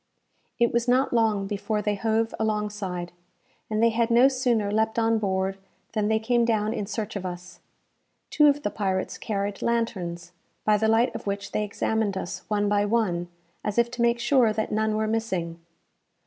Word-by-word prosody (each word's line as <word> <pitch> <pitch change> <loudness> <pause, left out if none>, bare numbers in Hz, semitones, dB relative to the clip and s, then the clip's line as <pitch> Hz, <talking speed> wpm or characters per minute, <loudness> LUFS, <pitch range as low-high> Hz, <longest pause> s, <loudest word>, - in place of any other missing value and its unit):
It 235 0 +2
was 235 +1 +1
not 255 +2 +2
long 220 -4 +2
before 210 +1 -2
they 210 0 +1
hove 225 +2 0
alongside, 210 -5 -2 0.6
and 215 +1 0
they 230 - +5
had 230 +1 +1
no 240 +3 +6
sooner 245 -6 0
leapt 220 +1 0
on 225 -1 +2
board, 190 -1 -1 0.3
than 215 -2 0
they 220 0 +2
came 235 +2 +1
down 220 -2 +1
in 210 -4 -3
search 215 0 -4
of 200 - -4
us. 180 0 -7 0.7
Two 300 -1 +5
of 290 0 +2
the 205 - -1
pirates 190 -2 -2
carried 200 -1 -3
lanterns, 180 -7 -2 0.3
by 215 -1 +4
the 220 +1 +1
light 225 +3 +3
of - - -7
which 200 0 -3
they 215 - 0
examined 210 -1 -1
us 175 - -5
one 205 -1 +1
by 205 0 +2
one, 205 -5 0 0.4
as 210 +1 -3
if 235 0 +3
to 245 - -4
make 235 0 +3
sure 245 -2 +3
that 215 0 -2
none 215 0 +1
were 220 0 0
missing. 190 -7 -2
215 Hz, 185 wpm, -26 LUFS, 200-230 Hz, 0.7 s, no